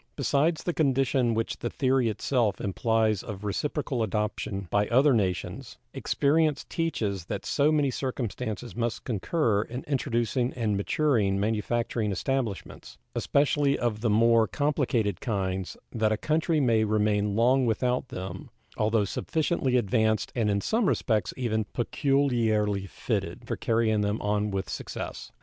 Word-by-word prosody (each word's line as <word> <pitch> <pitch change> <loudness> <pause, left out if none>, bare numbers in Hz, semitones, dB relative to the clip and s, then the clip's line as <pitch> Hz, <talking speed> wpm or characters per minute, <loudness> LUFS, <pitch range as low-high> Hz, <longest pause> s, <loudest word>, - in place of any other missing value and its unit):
Besides 145 +4 +1
the 175 - -1
condition 135 -5 +2
which 115 +1 -2
the 120 - -2
theory 130 -3 +1
itself 110 -1 0
implies 110 0 +1
of 105 -2 -7
reciprocal 130 +4 -2
adoption 105 -2 -2
by 105 0 +2
other 135 +4 +4
nations, 95 -6 -2 0.2
experience 150 +1 +1
teaches 105 - -2
that - - -5
so 145 +1 +2
many 145 -3 +2
circumstances 125 -2 -4
must 120 0 -2
concur 115 - 0
in 120 +4 -6
introducing 125 -2 -1
and 110 -4 -1
maturing 100 -2 +1
manufacturing 110 +1 -1
establishments, 105 - -3 0.2
especially 140 0 +2
of 110 -3 -1
the 115 - +1
more 115 +1 +4
complicated 125 - 0
kinds, 95 -4 -2
that 110 -2 +1
a 110 - +1
country 160 +4 +1
may 115 -5 +3
remain 105 -1 +1
long 125 +3 +3
without 125 +3 0
them, 95 -2 -7 0.3
although 110 -1 +2
sufficiently 145 - 0
advanced 110 -1 +1
and 115 -4 +1
in 100 -1 +1
some 225 - +1
respects 110 -6 +1
even 110 -4 0
peculiarly 115 -7 +1
fitted - - -3
for - - -2
carrying 110 -2 +1
them 105 +1 0
on 105 0 0
with 95 -2 -3
success. - - -6
115 Hz, 135 wpm, -27 LUFS, 105-135 Hz, 0.3 s, other